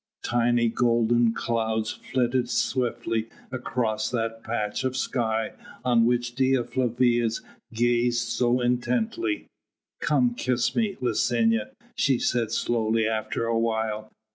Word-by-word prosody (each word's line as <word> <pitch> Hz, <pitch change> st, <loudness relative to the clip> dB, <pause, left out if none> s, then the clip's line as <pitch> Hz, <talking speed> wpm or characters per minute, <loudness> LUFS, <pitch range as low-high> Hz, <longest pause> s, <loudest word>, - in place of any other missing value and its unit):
Tiny 120 Hz, 0 st, +2 dB
golden 120 Hz, 0 st, +3 dB
clouds 110 Hz, -1 st, -1 dB
flitted 125 Hz, +1 st, -1 dB
swiftly 115 Hz, -3 st, -1 dB, 0.2 s
across 115 Hz, -4 st, -1 dB
that 115 Hz, -1 st, -3 dB
patch 105 Hz, -2 st, -2 dB
of 130 Hz, 0 st, -1 dB
sky 110 Hz, -4 st, -1 dB, 0.3 s
on 120 Hz, -2 st, +4 dB
which 120 Hz, 0 st, 0 dB
Dea 130 Hz, 0 st, +2 dB
Flavia 120 Hz, -1 st, +1 dB, 0.4 s
gazed 120 Hz, +1 st, +1 dB
so 125 Hz, +1 st, +1 dB
intently. 230 Hz, -, 0 dB, 0.5 s
"Come 135 Hz, -6 st, +2 dB
kiss 120 Hz, -1 st, 0 dB
me, 215 Hz, -4 st, 0 dB
Licinia," 115 Hz, -3 st, +1 dB, 0.3 s
she 135 Hz, -2 st, +2 dB
said 120 Hz, -2 st, 0 dB
slowly 110 Hz, -1 st, +1 dB
after 110 Hz, +1 st, -2 dB
a 115 Hz, 0 st, +1 dB
while. 110 Hz, -1 st, -1 dB
120 Hz, 115 wpm, -26 LUFS, 115-125 Hz, 0.5 s, on